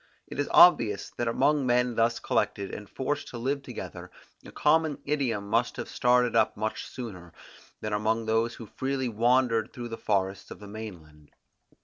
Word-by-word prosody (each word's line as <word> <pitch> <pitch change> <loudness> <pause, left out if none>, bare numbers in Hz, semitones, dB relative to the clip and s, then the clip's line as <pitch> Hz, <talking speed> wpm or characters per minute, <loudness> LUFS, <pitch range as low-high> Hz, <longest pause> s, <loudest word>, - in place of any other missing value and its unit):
It - - -8
is 145 - 0
obvious 115 - +5
that 120 - -1
among 140 +4 +2
men 125 0 +2
thus 115 +1 +2
collected, 100 -1 -1
and 105 - -8
forced 145 +2 -3
to 120 - -7
live 135 +4 -1
together, 90 -8 -8 0.3
a - - -11
common 155 -1 +2
idiom 120 -9 -1
must 115 +3 0
have - - -4
started 125 -1 +2
up 110 -2 +3
much 110 +1 -3
sooner, 90 -9 -8 0.5
than 105 -1 -3
among 110 +2 0
those 115 +1 +1
who 115 - -9
freely 130 +3 -2
wandered 115 0 +2
through 120 -2 -7
the 115 - -6
forests 95 -2 -1
of - - -9
the 105 - -10
main 105 -5 -8
land. 75 -1 -21
115 Hz, 175 wpm, -28 LUFS, 105-125 Hz, 0.5 s, obvious